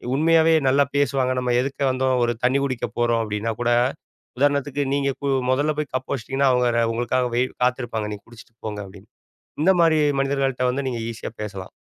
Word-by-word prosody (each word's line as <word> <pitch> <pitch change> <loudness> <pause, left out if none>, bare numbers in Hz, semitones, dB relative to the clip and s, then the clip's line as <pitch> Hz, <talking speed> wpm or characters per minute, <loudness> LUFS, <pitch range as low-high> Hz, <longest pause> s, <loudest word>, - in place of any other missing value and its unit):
உண்மையாவே 165 +2 +4
நல்லா 140 +2 +4
பேசுவாங்க. 135 -2 +1
"நம்ம 125 -1 0
எதிர்ல 135 +2 -5
வந்தோம், 130 0 +1
ஒரு 120 - 0
தண்ணி 130 +2 +3
குடிக்க 130 -3 -2
போறோம்." 120 -1 +2
அப்படீன்னா 105 +1 -2
கூட, 120 0 +1 0.7
உதாரணத்துக்கு 145 0 +1
நீங்க 140 -1 +1
கு 140 - -1 0.2
முதல்ல 145 +4 +1
போய் 150 -3 -3
கப் 130 0 -3
வச்சுட்டீங்கன்னா, 135 +2 0
அவங்க 125 0 +2
ர 115 - +3
உங்களுக்காக 120 +2 0
வெயிட் 125 +1 0
காத்திருப்பாங்க. 120 -4 -1
"நீங்க 100 - -10
குடிச்சிட்டு 115 0 -16
போங்க." 105 -1 -5
அப்படீன்னு. 100 +3 -15 0.5
இந்த 190 - +5
மாரி 160 -2 +4 0.2
மனிதர்கள்ட்ட 135 -2 0
வந்து 135 +2 -3
நீங்க 120 -2 -3
ஈசியா 115 - -7
பேசலாம். 100 -3 -7
130 Hz, 175 wpm, -22 LUFS, 120-140 Hz, 0.7 s, இந்த